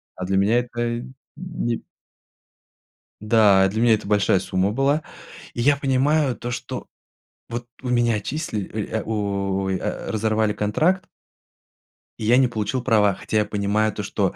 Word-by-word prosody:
А 90 - -5
для 95 +1 0
меня 110 +5 +3
это 120 0 -3 0.3
не 165 -9 -3 1.4
Да. 105 -3 +5
А 95 - +5
для 110 +4 -2
меня 120 -2 +5
это 105 -1 -1
большая 100 -2 +3
сумма 95 +1 0
была. 140 +6 +1 0.5
И 120 - -3
я 145 +3 +4
понимаю 140 0 +2
то, 120 - -5
что 125 - -5 0.6
вот 120 +1 -5 0.2
у 125 - -3
меня 120 -1 +3
отчисли, 110 - -3 0.2
э, 110 - -1
у, 100 -3 -1
о, - - -2
ай, 95 -1 -3
разорвали 110 0 +1
контракт 160 - +1 1.1
и 110 - -4
я 120 +3 +5
не 130 -1 +5
получил 120 +2 -2
права, 105 -5 +3
хотя 110 +3 -2
я 105 - +3
понимаю 105 +1 0
то, - - -4
что, - - -1
110 Hz, 160 wpm, -23 LUFS, 105-125 Hz, 1.4 s, Да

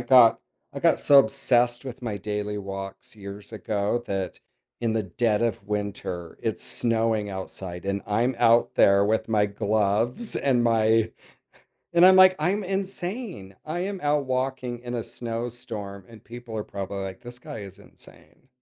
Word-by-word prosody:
got 125 -4 +6 0.3
I - - -6
got - - +4
so 140 -1 +6
obsessed 120 +1 +2
with 125 -1 -8
my 110 -4 -3
daily 105 +1 -3
walks 95 +1 -7
years 100 +2 -9
ago 105 +2 -1
that 95 -2 -3 0.4
in 115 -2 0
the 110 - +1
dead 105 +4 0
of 115 -4 -1
winter, 100 -5 -4
it's - - -2
snowing 115 -3 0
outside, 95 -1 -6
and 100 0 -1
I'm 120 +5 +1
out 120 0 +4
there 100 0 +5
with 110 +1 0
my 105 -2 +3
gloves, 105 - 0
and 125 -4 +2
my 115 -1 +3 0.8
and 170 +1 +7
I'm 185 0 +8
like, 185 0 +8
"I'm 190 +6 +1
insane." 190 - -4
I 160 +3 -3
am 195 0 -3
out 145 -1 +1
walking 130 -1 -2
in 120 0 -5
a 115 - -2
snowstorm, 115 -4 -6
and 115 -1 -14
people 120 -2 -8
are 105 - -2
probably 100 0 -5
like, 95 0 -7
"This 120 0 -9
guy 115 - -8
is 100 -2 -9
insane." 85 +11 -16
115 Hz, 160 wpm, -25 LUFS, 100-125 Hz, 0.8 s, I'm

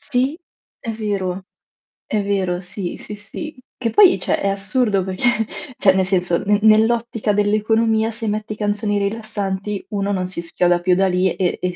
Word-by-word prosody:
Sì, 265 +3 0 0.4
è 230 - -5
vero, 195 -4 -3 0.6
è 210 -2 0
vero, 190 -3 0
sì, 180 0 -6
sì, - - -8
sì. 210 +10 -8 0.2
Che 230 -3 -1
poi 395 -3 +6
cioè, - - 0
è - - 0
assurdo 200 0 +1
perché 220 +4 0 0.3
cioè, 190 - +5
nel 190 0 +2
senso 180 -2 +1
n 205 +1 +2
nell'ottica 225 0 +3
dell'economia, 220 +2 +2
se 225 0 -3
metti 215 +1 -2
canzoni 205 0 -1
rilassanti, 200 -1 -3
uno 200 -1 -1
non 185 -2 -1
si 180 -2 -4
schioda 175 +1 +1
più 180 0 +3
da 195 +1 +3
lì 180 0 +1
e 180 -2 -1
e 180 -1 -2
205 Hz, 170 wpm, -20 LUFS, 190-220 Hz, 0.6 s, poi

